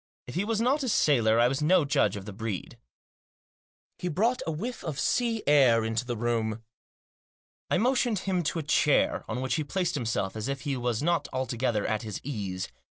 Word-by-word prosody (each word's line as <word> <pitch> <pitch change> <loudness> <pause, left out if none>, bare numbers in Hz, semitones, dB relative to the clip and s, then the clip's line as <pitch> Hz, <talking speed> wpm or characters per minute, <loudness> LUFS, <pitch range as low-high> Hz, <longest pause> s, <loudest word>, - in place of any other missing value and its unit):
If 125 - -9
he 180 - 0
was 225 0 0
not 260 +6 +2
a 260 - -1
sailor 115 - +3
I 120 - +5
was 135 +3 -1
no 170 +1 +4
judge 140 - +2
of 100 -1 -7
the 105 - -7
breed. 110 -2 -5 1.2
He 180 - -3
brought 225 - +1
a - - 0
whiff 225 +11 -5
of 155 -4 -4
sea 235 -3 +1
air 130 -6 +5
into 115 +2 -1
the 120 -2 -2
room. 115 -1 -1 1.1
I - - +2
motioned 245 -2 +2
him 185 -2 +1
to 160 - -1
a 160 - -2
chair, 145 0 +2
on 125 - -2
which 130 -2 -1
he 155 - 0
placed 175 +3 -1
himself 115 -8 -2
as 110 +1 -3
if 140 -1 -3
he 145 -3 -2
was 120 0 -1
not 170 +1 +1
altogether 125 -4 -1
at 110 -1 -1
his 105 -3 -5
ease. 100 -9 -4
135 Hz, 200 wpm, -28 LUFS, 115-175 Hz, 1.2 s, I